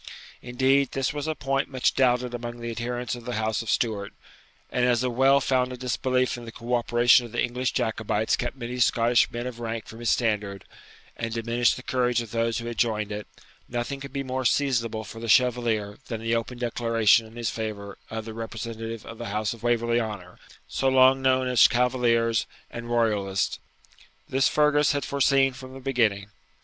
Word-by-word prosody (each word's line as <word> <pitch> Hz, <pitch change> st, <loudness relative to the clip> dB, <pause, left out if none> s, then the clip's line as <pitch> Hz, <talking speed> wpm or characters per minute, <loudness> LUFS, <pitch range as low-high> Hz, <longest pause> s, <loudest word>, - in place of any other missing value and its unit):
] -, -, -20 dB
Indeed, 130 Hz, +2 st, +1 dB
this 135 Hz, +1 st, -1 dB
was 145 Hz, +1 st, -4 dB
a 155 Hz, -, -1 dB
point 135 Hz, 0 st, -1 dB
much 130 Hz, -2 st, +1 dB
doubted 125 Hz, -1 st, +2 dB
among 120 Hz, 0 st, -6 dB
the 120 Hz, 0 st, -4 dB
adherents 120 Hz, +1 st, -3 dB
of 120 Hz, -1 st, -7 dB
the 125 Hz, -, -3 dB
house 110 Hz, +1 st, -1 dB
of 115 Hz, -, -7 dB
Stuart; 105 Hz, -4 st, -1 dB, 0.6 s
and 125 Hz, -, 0 dB
as 125 Hz, 0 st, +3 dB
a 125 Hz, -, 0 dB
well 135 Hz, +3 st, +4 dB
founded 130 Hz, -2 st, 0 dB
disbelief 130 Hz, 0 st, 0 dB
in 120 Hz, -, -9 dB
the 115 Hz, -, -8 dB
cooperation 120 Hz, +1 st, +3 dB
of -, -, -16 dB
the 120 Hz, -, +1 dB
English 125 Hz, +1 st, -1 dB
Jacobites 110 Hz, -1 st, 0 dB
kept 125 Hz, +2 st, -4 dB
many 125 Hz, 0 st, -5 dB
Scottish 120 Hz, 0 st, +3 dB
men 120 Hz, +1 st, -4 dB
of 125 Hz, -2 st, -6 dB
rank 115 Hz, -1 st, -4 dB
from 115 Hz, -, -11 dB
his 120 Hz, -2 st, -1 dB
standard, 105 Hz, -4 st, 0 dB, 0.5 s
and 115 Hz, -1 st, -4 dB
diminished 115 Hz, +1 st, +1 dB
the 130 Hz, -, -9 dB
courage 125 Hz, -2 st, +1 dB
of 115 Hz, -3 st, -6 dB
those 115 Hz, 0 st, 0 dB
who 115 Hz, -, -5 dB
had 120 Hz, -3 st, -5 dB
joined 105 Hz, -3 st, 0 dB
it, 105 Hz, 0 st, -5 dB, 0.4 s
nothing 120 Hz, +3 st, -3 dB
could 140 Hz, 0 st, -8 dB
be 140 Hz, 0 st, -3 dB
more 130 Hz, 0 st, -3 dB
seasonable 115 Hz, -4 st, +1 dB
for 115 Hz, +2 st, -10 dB
the 115 Hz, 0 st, -5 dB
Chevalier 115 Hz, -4 st, +2 dB
than 115 Hz, -3 st, -4 dB
the 115 Hz, +1 st, -1 dB
open 115 Hz, +2 st, -3 dB
declaration 115 Hz, -2 st, +2 dB
in 110 Hz, -, -16 dB
his 120 Hz, -2 st, -2 dB
favour 105 Hz, -3 st, -5 dB
of 110 Hz, -1 st, -5 dB
the 110 Hz, -, -7 dB
representative 115 Hz, 0 st, -6 dB
of 115 Hz, -, -10 dB
the 120 Hz, -, -5 dB
house 105 Hz, +1 st, -1 dB
of 115 Hz, -, -13 dB
Waverley 120 Hz, 0 st, +1 dB
Honour, 100 Hz, -5 st, -7 dB, 0.3 s
so 135 Hz, -, 0 dB
long 130 Hz, 0 st, +5 dB
known 130 Hz, -1 st, +2 dB
as 125 Hz, -2 st, +6 dB
Cavaliers 120 Hz, -2 st, +1 dB, 0.2 s
and 120 Hz, 0 st, -7 dB
Royalists. 105 Hz, -5 st, 0 dB, 0.7 s
This 135 Hz, +1 st, +2 dB
Fergus 150 Hz, -1 st, +3 dB
had 145 Hz, -2 st, -2 dB
foreseen 135 Hz, -1 st, +3 dB
from 130 Hz, 0 st, -11 dB
the -, -, -8 dB
beginning. 110 Hz, -7 st, 0 dB
120 Hz, 195 wpm, -26 LUFS, 115-130 Hz, 0.7 s, as